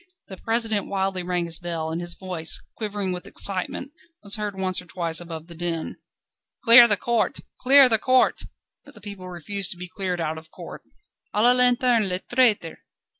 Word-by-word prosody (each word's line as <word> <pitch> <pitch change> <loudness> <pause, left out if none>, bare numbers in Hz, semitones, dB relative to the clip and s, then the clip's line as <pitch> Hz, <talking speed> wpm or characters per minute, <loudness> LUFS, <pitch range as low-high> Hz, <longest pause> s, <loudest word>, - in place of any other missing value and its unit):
The 190 - -9
President 225 -2 -1
wildly 190 -1 -2
rang 175 -1 -2
his 165 -1 -4
bell, 165 -2 -4
and 165 +2 -3
his 175 -1 -3
voice, 180 -4 -2 0.2
quivering 205 -3 -3
with 180 0 -6
excitement, 200 +8 -1 0.3
was 200 +1 -1
heard 210 -3 -4
once 185 -1 -1
or 180 - -17
twice 170 -2 -1
above 165 -2 -8
the 170 - -13
din. 170 -1 -4 0.7
"Clear 235 0 +9
the 205 -3 +3
court! 235 +5 -1 0.2
Clear 270 +1 +7
the 225 -3 +2
court!" 255 +2 +2 0.4
But - - -17
the - - -13
people 195 -2 -9
refused 180 +2 -2
to - - -18
be 180 +1 -7
cleared 185 -1 -4
out 160 -1 -3
of 160 0 -19
court. - - -11 0.5
"_A 210 - +2
la 245 - +7
lanterne 245 -3 +3
les 180 - -1
traîtres! 235 -9 +1
190 Hz, 185 wpm, -23 LUFS, 175-225 Hz, 0.7 s, Clear